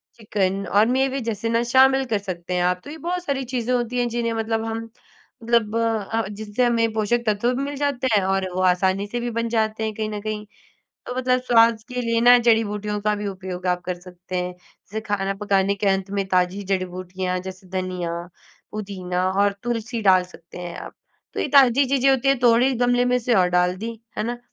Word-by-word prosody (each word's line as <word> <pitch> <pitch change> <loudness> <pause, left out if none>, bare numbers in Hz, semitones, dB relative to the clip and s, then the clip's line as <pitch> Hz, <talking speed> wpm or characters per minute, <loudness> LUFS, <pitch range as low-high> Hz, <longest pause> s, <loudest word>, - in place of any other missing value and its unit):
Chicken 200 -3 -1
और 205 +2 +5
मेवे 265 +2 +1
जैसे 230 -1 -3
ना, 230 +1 +2
शामिल 265 +2 +4
कर 210 - +2
सकते 180 -3 -5
हैं 180 - +1
आप। 180 0 +1
तो - - -8
ये 315 - -8
बहुत 350 +2 -3
सारी 275 -1 -1
चीज़ें 245 0 0
होती 245 0 -1
हैं, 245 - +1
जिन्हें 230 0 -1
मतलब 225 0 -1
हम 225 0 -4 0.5
मतलब 225 -2 +1
अ, 225 -1 0
जिनसे 210 +3 -1
हमें 230 -2 +1
पोषक 220 +2 0
तत्व 215 +4 +1
भी 270 - -2
मिल 285 +1 -4
जाते 275 -2 0
हैं 200 - +1
और 190 0 0
वो 185 - 0
आसानी 190 +2 0
से 240 +4 -3
भी 240 - -2
बन 230 0 -2
जाते 220 -1 0
हैं, 220 0 -2
कहीं 215 0 -2
न 210 -1 -5
कहीं। 215 0 -4 0.6
तो 250 - -4
मतलब 255 0 +2
स्वाद 230 -2 +4
के 250 0 -3
लिए 230 -1 +1
ना, 245 +1 +8
जड़ी-बूटियों 210 -3 +1
का 210 +1 +1
भी 205 0 -4
उपयोग 185 -1 -6
आप 180 0 +1
कर 180 -1 -4
सकते 180 0 -8
हैं। 180 0 -2
जैसे 195 +4 -10
खाना 195 -1 -1
पकाने 200 -1 +1
के 200 +1 -3
अंत 195 0 0
में 195 - 0
ताज़ी 185 +2 +1
जड़ी-बूटियाँ 185 -1 -2
जैसे 185 0 -9
धनिया, 185 -2 -3 0.6
पुदीना, 185 -4 -3
और 200 +1 +2
तुलसी 235 -1 -2
डाल 185 -2 +5
सकते 170 +1 -13
हैं 175 -1 -6
आप। - - -9 0.4
तो - - -2
ये - - -1
ताज़ी 270 0 +6
चीज़ें 270 0 +3
होती 270 0 +2
हैं, 275 -1 +3
तोड़ी 245 +2 +4
गमले 245 0 +3
में 250 0 +2
से 245 0 +1
और 185 -4 +4
डाल 180 +1 +2
दी। 225 +4 -5 0.3
है - - 0
ना? 240 +1 -3
215 Hz, 215 wpm, -23 LUFS, 190-240 Hz, 0.6 s, ना